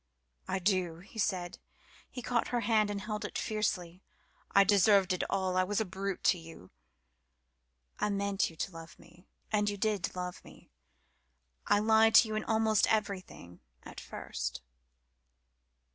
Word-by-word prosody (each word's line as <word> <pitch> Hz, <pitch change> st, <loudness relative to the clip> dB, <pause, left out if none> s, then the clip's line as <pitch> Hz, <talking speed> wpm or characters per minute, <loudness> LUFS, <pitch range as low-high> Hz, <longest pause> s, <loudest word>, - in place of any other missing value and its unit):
"I -, -, -1 dB
do," 185 Hz, -3 st, 0 dB
he 215 Hz, +4 st, -11 dB
said. 180 Hz, -4 st, -1 dB, 0.5 s
He 250 Hz, -, -8 dB
caught 240 Hz, -1 st, 0 dB
her 240 Hz, -1 st, -1 dB
hand 215 Hz, -1 st, +2 dB
and 205 Hz, -1 st, -3 dB
held 210 Hz, +1 st, -4 dB
it -, -, -4 dB
fiercely. 185 Hz, -5 st, -2 dB, 0.5 s
"I 200 Hz, -, +6 dB
deserved 195 Hz, -1 st, +4 dB
it 180 Hz, -, -1 dB
all. 190 Hz, -1 st, 0 dB
I 185 Hz, -, +4 dB
was 205 Hz, +3 st, -1 dB
a 220 Hz, -, 0 dB
brute 195 Hz, +1 st, -4 dB
to 180 Hz, -, +3 dB
you." 165 Hz, -, -13 dB, 1.3 s
"I 210 Hz, -, +1 dB
meant 200 Hz, -1 st, 0 dB
you 165 Hz, -, -14 dB
to 190 Hz, -, -4 dB
love 165 Hz, -1 st, -11 dB
me 170 Hz, +2 st, -20 dB, 0.2 s
and 210 Hz, -1 st, +2 dB
you 205 Hz, -, -4 dB
did 200 Hz, -4 st, -1 dB
love 180 Hz, 0 st, -5 dB
me. -, -, -17 dB, 1.0 s
I -, -, +4 dB
lied 220 Hz, +1 st, +4 dB
to 230 Hz, -, +8 dB
you 215 Hz, -, -4 dB
in 215 Hz, -, -1 dB
almost 220 Hz, 0 st, +2 dB
everything 195 Hz, -, -3 dB, 0.2 s
at -, -, -9 dB
first." -, -, -6 dB
200 Hz, 160 wpm, -31 LUFS, 180-215 Hz, 1.3 s, to